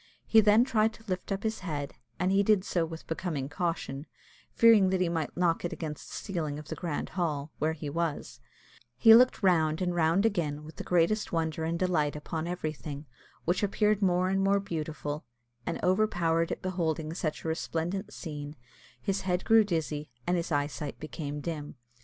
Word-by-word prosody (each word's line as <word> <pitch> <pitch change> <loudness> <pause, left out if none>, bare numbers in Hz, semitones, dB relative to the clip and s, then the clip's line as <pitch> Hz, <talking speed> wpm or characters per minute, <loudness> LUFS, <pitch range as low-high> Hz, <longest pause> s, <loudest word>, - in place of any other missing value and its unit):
He 225 - +6
then 215 +2 +6
tried 220 -4 +2
to 225 - -16
lift 185 +1 -3
up 195 0 -2
his 220 0 -1
head, 150 -6 -4 0.3
and 185 +1 +2
he 195 +1 +4
did 200 -2 +3
so 170 -2 0
with 160 0 -8
becoming 160 -5 -3
caution, 165 -3 -3 0.4
fearing 220 -5 +6
that 190 0 +1
he 180 -2 +2
might 165 -2 -3
knock 175 -2 +2
it 175 - -2
against 155 -3 -6
the - - -7
ceiling 160 -7 -3
of 150 +1 -9
the - - -3
grand 165 -5 -3
hall, 155 -5 -2
where 155 +2 +1
he 150 -1 -6
was; 165 +1 -3 0.6
he 225 - +8
looked 250 -1 +6
round 160 -4 +3
and 180 -1 0
round 170 +4 +3
again 155 -9 0
with 155 +1 -12
the - - -5
greatest 180 +5 +2
wonder 160 -1 -1
and 165 +1 -1
delight 165 -5 +1
upon 160 +2 -4
everything, 155 -4 -4 0.4
which 175 +2 +1
appeared 210 0 +2
more 185 -1 +2
and 195 0 +1
more 200 +1 +3
beautiful; 155 -5 -4 0.4
and, - - -2
overpowered 175 -4 +2
at - - -4
beholding 160 -4 -1
such 160 -3 -3
a - - -4
resplendent 170 +5 -2
scene, 150 -3 -7 0.4
his 195 +9 -1
head 180 -1 -1
grew 225 0 +6
dizzy, 155 -6 -2 0.2
and 175 - +1
his 170 -1 -2
eyesight 145 0 -2
became 150 -1 -5
dim. 150 -2 -5
170 Hz, 185 wpm, -29 LUFS, 155-190 Hz, 0.6 s, he